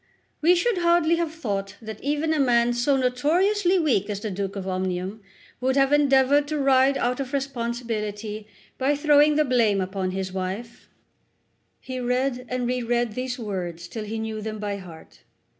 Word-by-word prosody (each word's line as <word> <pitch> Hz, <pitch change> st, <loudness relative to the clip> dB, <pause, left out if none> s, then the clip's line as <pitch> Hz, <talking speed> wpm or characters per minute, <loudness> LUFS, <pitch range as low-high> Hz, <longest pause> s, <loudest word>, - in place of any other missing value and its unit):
"We 345 Hz, +4 st, +5 dB
should 385 Hz, +2 st, +1 dB
hardly 340 Hz, -1 st, +3 dB
have 335 Hz, -2 st, -1 dB
thought 200 Hz, -11 st, -4 dB
that 220 Hz, -2 st, -8 dB
even 295 Hz, +3 st, 0 dB
a 310 Hz, -, 0 dB
man 240 Hz, -2 st, +3 dB
so 245 Hz, +3 st, +2 dB
notoriously 350 Hz, +10 st, +2 dB
weak 240 Hz, -, +1 dB
as 205 Hz, -1 st, -3 dB
the 215 Hz, 0 st, -4 dB
Duke 195 Hz, +1 st, -4 dB
of 195 Hz, -1 st, -5 dB
Omnium 185 Hz, +2 st, -3 dB, 0.4 s
would 260 Hz, +1 st, +1 dB
have 275 Hz, 0 st, +3 dB
endeavoured 285 Hz, 0 st, +4 dB
to 305 Hz, +1 st, -2 dB
ride 270 Hz, -1 st, +4 dB
out 250 Hz, +2 st, -1 dB
of 270 Hz, 0 st, -4 dB
responsibility 230 Hz, -5 st, -3 dB, 0.3 s
by 275 Hz, +2 st, +2 dB
throwing 295 Hz, 0 st, +4 dB
the 305 Hz, 0 st, +3 dB
blame 230 Hz, -6 st, +2 dB
upon 190 Hz, 0 st, -2 dB
his 190 Hz, 0 st, -4 dB
wife." 190 Hz, +5 st, -5 dB, 0.9 s
He 255 Hz, -1 st, -6 dB
read 250 Hz, 0 st, -1 dB
and 250 Hz, -1 st, -2 dB
reread 240 Hz, -1 st, 0 dB
these 255 Hz, +3 st, -4 dB
words 180 Hz, -6 st, -5 dB
till 215 Hz, +4 st, -6 dB
he 220 Hz, +2 st, -4 dB
knew 220 Hz, -1 st, -4 dB
them 215 Hz, 0 st, -5 dB
by 205 Hz, -1 st, -3 dB
heart. 175 Hz, -4 st, -13 dB
245 Hz, 170 wpm, -24 LUFS, 210-280 Hz, 0.9 s, We